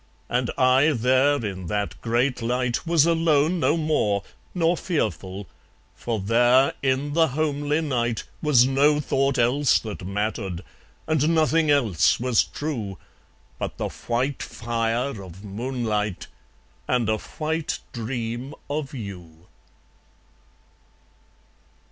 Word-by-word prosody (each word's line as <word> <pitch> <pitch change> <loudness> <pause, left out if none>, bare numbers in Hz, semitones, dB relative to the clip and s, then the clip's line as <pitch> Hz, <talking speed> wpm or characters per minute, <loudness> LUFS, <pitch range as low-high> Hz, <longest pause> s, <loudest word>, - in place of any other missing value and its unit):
And 125 0 0
I 130 +4 +4
there 130 +2 +2
in 95 -3 -5
that 105 +2 -3
great 120 +2 0
light 125 +4 -1
Was 165 -3 +4
alone 165 0 +2
no 160 0 +2
more, 110 -11 +1 0.3
nor 170 0 +2
fearful; 100 - -3 0.5
For 115 -2 -3
there, 120 +6 +4
in 140 +2 0
the 165 0 +4
homely 145 +1 0
night, 120 -6 -1 0.2
Was 140 -6 +5
no 145 +3 +3
thought 135 -1 0
else 125 +4 +3
that 105 -4 -6
mattered, 100 -2 -3 0.4
And 155 -1 +1
nothing 160 0 +3
else 120 - +3
was 125 -1 +3
true, 115 -11 -5 0.6
But - - -4
the - - -2
white 125 +4 -2
fire 115 +1 -2
of 95 +1 -11
moonlight, 105 -2 -2 0.6
And 125 -3 +1
a 110 0 +1
white 155 +4 -3 0.2
dream 120 +2 -4 0.2
of 145 -1 -3
you. 90 -7 -9
125 Hz, 115 wpm, -24 LUFS, 110-145 Hz, 0.6 s, Was